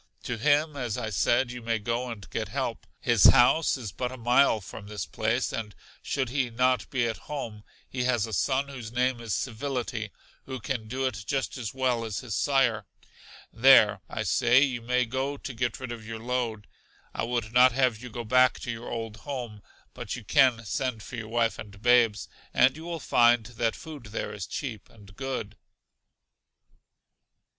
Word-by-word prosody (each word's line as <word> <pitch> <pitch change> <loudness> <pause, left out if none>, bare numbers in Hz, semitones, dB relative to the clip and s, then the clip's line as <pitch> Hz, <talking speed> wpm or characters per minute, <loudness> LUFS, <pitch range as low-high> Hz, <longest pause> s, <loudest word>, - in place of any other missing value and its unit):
To 125 - -3
him 145 +6 +2
as 125 -5 -3
I 110 -3 -3
said, 120 +5 +2
you 125 0 -7
may 115 0 0
go 120 +3 -2
and 105 -5 -8
get - - -2
help. - - -4
His 115 -5 +4
house 140 +6 +6
in 125 - -8
but 125 0 -2
a 130 - -8
mile 120 0 +4
from 100 +1 -10
this 105 0 -4
place, 115 +4 -1
and 110 -3 -5 0.3
should 130 -3 -2
he 130 -1 0
not 125 0 +1
be 125 -3 0
at 110 - -3
home, 115 -8 -5 0.2
he 125 -1 -3
has 120 -4 +2
a 110 - -8
son 135 +6 +1
whose 120 -5 -8
name 125 0 0
is 115 -4 -2
Civility, 120 -3 -3 0.4
who 130 -1 -5
can 120 -6 -4
do 130 +4 -2
it 115 -4 -3
just 135 -2 -1
as 120 -3 -5
well 125 -3 +1
as 110 -3 -4
his 120 -6 -4
sire. 120 -7 +2 0.7
There, - - +6
I - - -3
say, 125 +2 +4
you 130 -4 -1
may 125 +2 +1
go 130 +4 -2
to 135 - -7
get 120 +1 -2
rid 130 -2 -6
of 115 -2 -7
your 115 +1 -6
load. 115 -2 -2 0.5
I - - -3
would 115 -1 -2
not 125 +1 +7
have 125 -4 +1
you 125 - -8
go 120 +1 -5
back 125 +3 +4
to 120 - -3
your 115 +1 -7
old 115 -2 -5
home, 120 -6 -6 0.3
but - - -5
you 125 - -8
can 120 0 +3
send 115 +1 -2
for 125 - -8
your 110 -2 -6
wife 115 0 0
and 100 -1 -9
babes, 115 -3 +3 0.3
and 130 +2 +5
you 160 +1 -9
will 170 -1 -4
find 120 -4 +4
that 115 -1 -1
food 150 -6 -10
there 105 0 -4
is 105 -3 -6
cheap 115 -8 -6
and 100 -3 -17
good. 130 -5 -4
120 Hz, 190 wpm, -27 LUFS, 110-130 Hz, 0.7 s, not